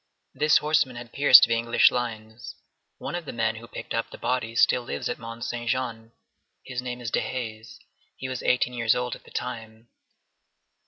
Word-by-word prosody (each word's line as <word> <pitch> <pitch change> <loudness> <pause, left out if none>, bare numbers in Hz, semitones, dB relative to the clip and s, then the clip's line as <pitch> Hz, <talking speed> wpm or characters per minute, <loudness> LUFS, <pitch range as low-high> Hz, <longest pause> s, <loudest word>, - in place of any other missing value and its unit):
This 150 +2 +4
horseman 150 -4 +1
had 120 0 -10
pierced 140 -3 +8
the 115 - +4
English 115 0 +4
lines. 115 -1 -5 0.4
One - - -6
of 175 -1 -4
the - - -5
men 110 -1 -1
who 115 +1 -11
picked - - -7
up - - -1
the - - -10
body 125 -3 -2
still 125 - +4
lives 120 - -4
at - - -4
Mont 115 0 -8
Saint 120 -1 -4
Jean. 115 -3 -3 0.5
His 125 -2 -4
name 125 -1 -5
is 115 -1 -4
Dehaze. 115 -3 -4 0.4
He 130 - -5
was 130 -2 -4
eighteen 125 0 +1
years 115 -2 +2
old 125 -1 -2
at - - -17
that - - -17
time. 115 -2 -6
120 Hz, 190 wpm, -26 LUFS, 115-125 Hz, 0.5 s, pierced